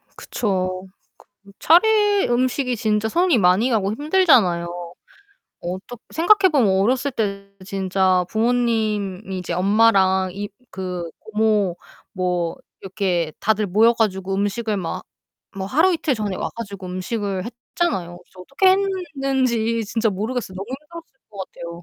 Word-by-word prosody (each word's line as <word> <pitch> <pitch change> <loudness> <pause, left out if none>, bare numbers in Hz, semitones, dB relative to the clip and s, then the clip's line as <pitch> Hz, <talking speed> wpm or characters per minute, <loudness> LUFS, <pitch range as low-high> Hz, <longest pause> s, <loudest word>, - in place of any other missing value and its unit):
그쵸. 185 -3 -2 0.6
그 200 - -17
차례 415 +3 +4
음식이 250 +1 0
진짜 215 -1 0
손이 345 -1 +2
많이 190 +5 +3
가고 210 -3 +1
힘들잖아요. 265 - +3 0.9
어떻 185 +7 -6
생각해보면 330 - +4
어렸을 255 +6 +1
때 200 -4 -3
진짜 190 -1 +1
부모님이 220 -5 0
이제 180 - -5
엄마랑 190 -1 +3
이 205 +2 -5 0.2
그 180 -3 -5
고모 210 -4 0 0.4
뭐 180 -3 -1 0.3
이렇게 180 -4 -1
다들 215 0 +1
모여 220 +5 +4
가지고 195 -4 -1
음식을 205 +2 -1
막 175 -4 -4 0.5
뭐 190 0 -3
하루 320 - +3
이틀 310 -4 0
전에 210 -4 -3
와 - - -3
가지고 200 -4 -7
음식을 190 +1 -3 0.3
했잖아요. 180 - -1
그래서 180 +1 -22
어떻게 275 - +2
했는지 270 - 0
진짜 225 +2 0
모르겠어. 215 +1 -3
너무 190 +1 -5 0.2
힘들었을 325 -3 -13
것 200 - -14
같아요. 170 -2 -8
210 Hz, 290 characters per minute, -21 LUFS, 190-250 Hz, 0.9 s, 차례